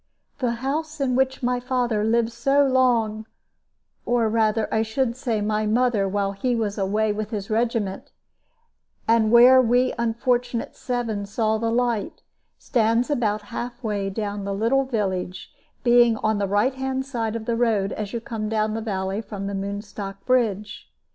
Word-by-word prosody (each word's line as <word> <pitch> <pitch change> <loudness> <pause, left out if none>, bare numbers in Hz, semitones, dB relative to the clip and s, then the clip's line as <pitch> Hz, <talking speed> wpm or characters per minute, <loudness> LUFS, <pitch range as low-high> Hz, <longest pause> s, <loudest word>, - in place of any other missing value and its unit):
The 245 -2 0
house 310 +2 -2
in 260 -3 +1
which 265 0 0
my 245 0 +1
father 245 -4 0
lived 230 +1 +2
so 275 +5 +2
long 235 -5 +2 0.8
or 235 -2 +1
rather, 220 0 +1
I 220 - +2
should 235 +2 -1
say, 235 -4 -2
my 215 +1 0
mother, 220 -3 +2
while 200 0 0
he 240 +5 -1
was 210 -3 -2
away 210 +2 +1
with 210 0 -4
his 205 -2 -5
regiment 225 -3 -1 1.0
and 225 -1 +3
where 250 +2 +8
we 250 +1 +2
unfortunate 235 +1 -1
seven 230 -5 -3
saw 220 +1 0
the 230 0 0
light, 235 -2 -1 0.3
stands 230 +2 +1
about 215 -6 0
half 245 +1 -5
way 205 -3 -1
down 205 0 -4
the 200 0 -3
little 245 +6 +2
village, 190 -7 -3 0.3
being 240 -2 +5
on 215 -1 +1
the 200 - 0
right 205 +7 +2
hand 265 0 -3
side 230 -5 -3
of 225 -1 -5
the 235 - 0
road 220 -4 +1
as 210 -2 -5
you 235 - -3
come 225 -3 -4
down 215 -1 0
the 225 - -3
valley 195 -1 -2
from 200 -2 -7
the 200 - -3
Moonstock 200 0 -6
bridge. 215 -5 0
225 Hz, 165 wpm, -23 LUFS, 210-245 Hz, 1.0 s, where